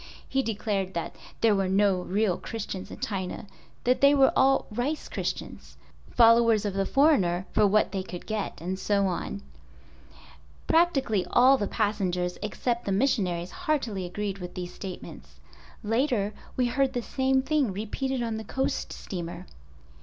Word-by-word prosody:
He 270 - +1
declared 205 -5 -2 0.4
there 225 -2 +4
were 195 -1 +1
no 195 -1 +2
real 195 0 0
Christians 200 -4 -6
in - - -9
China, 190 -3 -3 0.4
that 250 +1 +2
they 280 +1 +6
were 270 -1 +5
all 270 0 +4
"rice" 260 +8 -2
Christians—followers 230 -2 +1
of 205 - -1
the 195 0 0
foreigner 195 - +3
for 210 - +4
what 210 0 +2
they 190 -1 -2
could 180 -2 -8
get 215 -2 -3
and 185 +3 -4
so 200 +1 +1
on. 65 - -3 1.2
Practically 270 - +2
all 255 +3 +6
the 205 -6 -1
passengers, 185 -5 -1
except 235 +3 -2
the 200 - -1
missionaries 190 -6 0
heartily 235 -11 -2
agreed 200 +1 -4
with 180 -1 -8
these 180 -1 -5
statements. 70 - -9 0.4
Later 225 -2 0 0.2
we 250 - +3
heard 265 +2 +1
the 245 -2 -2
same 265 +1 +1
thing 285 -5 +1
repeated 240 +6 -3
on 225 -1 -2
the 220 - -5
coast 265 +5 -2
steamer. 175 -1 -6
210 Hz, 145 wpm, -27 LUFS, 190-255 Hz, 1.2 s, they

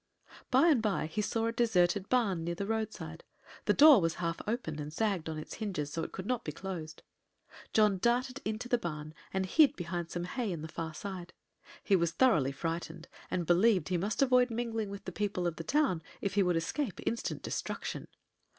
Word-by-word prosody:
By 270 +6 +5
and 275 -8 +4
by 195 -9 0
he 160 +7 -2
saw 225 +2 0
a 230 - +1
deserted 200 -5 +2
barn 205 -10 +2
near 170 +1 -2
the 200 - -3
roadside. 220 0 -4 0.4
The - - +4
door 290 -7 +8
was 165 -1 0
half 170 -1 -2
open 210 - -2
and 150 0 -5
sagged 185 -2 -1
on 160 - -4
its 155 - -7
hinges, 185 -10 -3
so 165 - -2
it - - -4
could 190 - -6
not 250 +2 -1
be 150 - -3
closed. 165 -2 -7 0.7
John 210 -3 +4
darted 250 +5 +1
into 220 +3 -3
the 245 -1 +2
barn 155 -5 -5 0.2
and 190 0 0
hid 300 - +5
behind 175 -1 -4
some 175 - -3
hay 215 +4 -2
in 165 -3 -4
the - - -4
far 160 0 -5
side. 185 0 -6 0.5
He 200 - +4
was 170 -2 +1
thoroughly 170 - +4
frightened, 165 +2 -4 0.2
and 175 -2 -1
believed 185 0 +4
he 180 - +1
must 205 +8 +1
avoid 250 -1 +4
mingling 225 -2 -2
with 200 0 -8
the 185 - -4
people 195 -2 -2
of 170 -2 -1
the 165 - -4
town 275 - +1 0.2
if 200 -1 -2
he 200 - +3
would 180 -3 +2
escape 210 - -2
instant 230 - -2
destruction. - - -4
190 Hz, 205 wpm, -32 LUFS, 165-225 Hz, 0.7 s, door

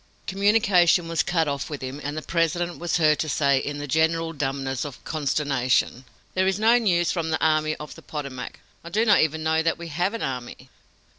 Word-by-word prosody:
Communication 195 -4 +3
was 165 -1 +1
cut 165 -3 0
off 140 -1 -3
with 145 -3 -6
him, 130 +3 -6
and 145 +2 -4
the 155 - -4
President 170 +1 -1
was 175 0 0
heard 155 -2 +3
to 155 - -1
say 140 -2 +2
in 145 +2 -4
the 145 - -5
general 160 +3 +1
dumbness 135 -3 -2
of 145 -3 -7
consternation: 135 -4 0 0.3
"There 185 0 +1
is 190 0 +1
no 230 +3 +5
news 175 -6 +2
from 165 -3 -2
the 160 - 0
Army 155 -1 +2
of 150 0 -9
the - - -14
Potomac. 140 -5 -7 0.2
I 170 - -8
do 215 +6 +1
not 210 -3 +5
even 155 0 0
know 160 0 +2
that 165 0 0
we 170 0 -8
have 180 +7 -1
an 230 - -4
army!" 125 0 -6
160 Hz, 210 wpm, -24 LUFS, 140-175 Hz, 0.3 s, no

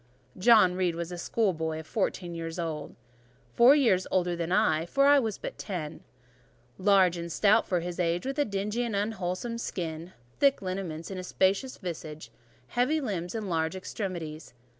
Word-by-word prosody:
John 205 -2 +6
Reed 180 -2 0
was 170 +1 -4
a 175 - -5
schoolboy 160 -6 -1
of 160 - -9
fourteen 180 -2 -2
years 165 0 -5
old; 160 -3 -4 0.6
four 250 +4 +7
years 225 -11 +3
older 180 -1 +1
than 170 0 -3
I, 160 -2 +2
for 275 +8 +2
I 285 0 +7
was 220 -6 -2
but - - -7
ten: 165 -6 -5 0.8
large 190 -3 +4
and 170 0 -5
stout 210 +6 +3
for 180 -2 0
his 175 +1 -5
age, 175 +2 0
with 270 +2 -3
a 290 - +3
dingy 205 +4 -2
and 230 -3 -2
unwholesome 205 +2 -2
skin; 170 -4 -5 0.3
thick 280 -1 +4
lineaments 185 -3 -5
in 190 - -5
a - - -5
spacious 195 +8 0
visage, 155 - -7 0.4
heavy 255 +6 +1
limbs 190 - -3
and 220 -2 -3
large 160 0 -1
extremities. 170 - -6
185 Hz, 170 wpm, -28 LUFS, 170-215 Hz, 0.8 s, four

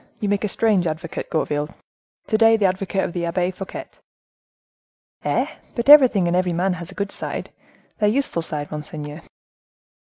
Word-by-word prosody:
You 210 -3 -1
make 205 0 0
a - - +1
strange 200 -4 +2
advocate, 160 +1 -5
Gourville, 150 -2 -1 0.6
to 220 - -1
day—the 225 -1 +5
advocate 190 +1 0
of - - -3
the 170 -1 -2
Abbe 175 +2 0
Fouquet!" 190 +1 -7 1.4
"Eh! - - +1 0.3
but 235 +3 -1
everything 255 -11 +8
and 170 - +1
every 180 -1 +1
man 180 +3 +1
has 170 -1 -7
a 190 - -12
good 200 -1 -3
side—their 210 -1 -4
useful 240 -7 0
side, 150 -2 -1
monseigneur." 150 0 -7
185 Hz, 155 wpm, -22 LUFS, 170-210 Hz, 1.4 s, everything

